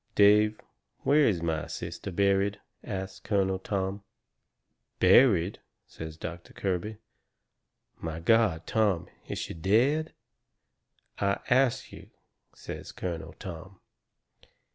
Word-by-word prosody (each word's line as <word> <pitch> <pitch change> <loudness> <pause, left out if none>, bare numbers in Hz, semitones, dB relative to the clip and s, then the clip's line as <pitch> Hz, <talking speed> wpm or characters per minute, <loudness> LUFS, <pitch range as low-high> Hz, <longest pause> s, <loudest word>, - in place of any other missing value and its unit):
"Dave, 105 +1 +5 0.4
where 145 0 +4
is 90 -6 0
my 80 -2 -1
sister - - -6
buried?" 100 +1 +2 0.2
asts 95 0 -5
Colonel 95 -3 0
Tom. 95 +1 -2 1.0
"Buried?" 100 -7 +5 0.3
says 80 -1 -9
Doctor 85 +1 -7
Kirby. 100 +3 -2 1.0
"My 80 -1 -4
God, 100 -3 +3
Tom, 100 -6 +1 0.2
is - - -4
she - - -4
DEAD?" 120 - +2 1.1
"I 100 0 +1
ask 130 -1 +3
you," - - -12 0.5
says - - -8
Colonel 85 -3 -5
Tom. 95 0 -9
95 Hz, 100 wpm, -29 LUFS, 85-105 Hz, 1.1 s, Dave